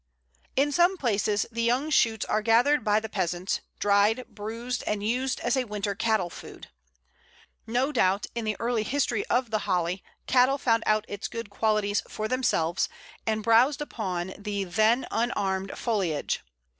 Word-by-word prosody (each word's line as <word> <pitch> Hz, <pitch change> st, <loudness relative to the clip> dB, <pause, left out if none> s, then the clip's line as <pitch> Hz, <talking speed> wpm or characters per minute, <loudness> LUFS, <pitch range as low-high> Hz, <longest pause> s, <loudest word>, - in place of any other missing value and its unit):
In 285 Hz, +2 st, +2 dB
some 350 Hz, +5 st, +3 dB
places 210 Hz, -, +1 dB
the 230 Hz, 0 st, -2 dB
young 250 Hz, +6 st, +1 dB
shoots 225 Hz, -6 st, +3 dB
are 215 Hz, -, 0 dB
gathered 240 Hz, +5 st, +3 dB
by 210 Hz, 0 st, +3 dB
the 220 Hz, -, -6 dB
peasants, 180 Hz, -2 st, -2 dB, 0.2 s
dried, 205 Hz, +4 st, +3 dB
bruised, 230 Hz, +4 st, -5 dB
and 210 Hz, -1 st, -1 dB
used 255 Hz, +4 st, 0 dB
as 240 Hz, +1 st, +1 dB
a 260 Hz, -1 st, 0 dB
winter 205 Hz, -2 st, -3 dB
cattle 205 Hz, -4 st, 0 dB
food. -, -, -11 dB, 1.0 s
No 250 Hz, +5 st, +1 dB
doubt, 195 Hz, -6 st, +2 dB
in 235 Hz, -, -3 dB
the 215 Hz, -2 st, -2 dB
early 235 Hz, -1 st, 0 dB
history 240 Hz, -2 st, 0 dB
of 245 Hz, -2 st, +1 dB
the 215 Hz, -, +1 dB
Holly, 180 Hz, 0 st, 0 dB, 0.2 s
cattle 255 Hz, +2 st, +4 dB
found 230 Hz, -4 st, +2 dB
out 215 Hz, 0 st, +2 dB
its 205 Hz, 0 st, -5 dB
good 230 Hz, -3 st, -7 dB
qualities 210 Hz, -1 st, +1 dB
for 215 Hz, -, -3 dB
themselves, 215 Hz, -9 st, +1 dB, 0.4 s
and 220 Hz, -1 st, 0 dB
browsed 240 Hz, +6 st, +4 dB
upon 190 Hz, -10 st, -4 dB
the 205 Hz, -1 st, -2 dB
then 220 Hz, +7 st, +2 dB
unarmed 195 Hz, -5 st, -1 dB
foliage. 190 Hz, -, -1 dB
220 Hz, 155 wpm, -27 LUFS, 200-245 Hz, 1.0 s, cattle